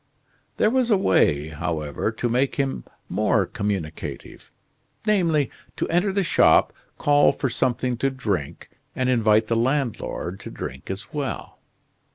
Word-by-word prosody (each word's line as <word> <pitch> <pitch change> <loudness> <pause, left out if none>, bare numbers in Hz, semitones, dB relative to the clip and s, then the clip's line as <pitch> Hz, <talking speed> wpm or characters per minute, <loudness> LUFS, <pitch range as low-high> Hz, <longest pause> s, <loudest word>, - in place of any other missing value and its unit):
There 215 - +3
was 255 -1 +2
a 210 - +5
way, 80 - +2
however, 75 +4 -2
to 115 +2 -2
make 125 +3 +1
him 135 - -2 0.2
more 105 +1 +2
communicative, 95 -6 -5 0.6
namely, 170 - +2 0.2
to - - -2
enter 180 +4 +2
the 195 0 +1
shop, 170 - +4 0.2
call 145 0 +4
for 130 - -2
something 125 0 0
to 135 +3 +1
drink, 105 - -3 0.3
and 130 0 0
invite 110 -2 +3
the 115 - 0
landlord 120 -7 -1
to - - -8
drink 65 +2 -7
as 95 +2 -6
well. 145 -3 -4
120 Hz, 140 wpm, -24 LUFS, 95-145 Hz, 0.6 s, a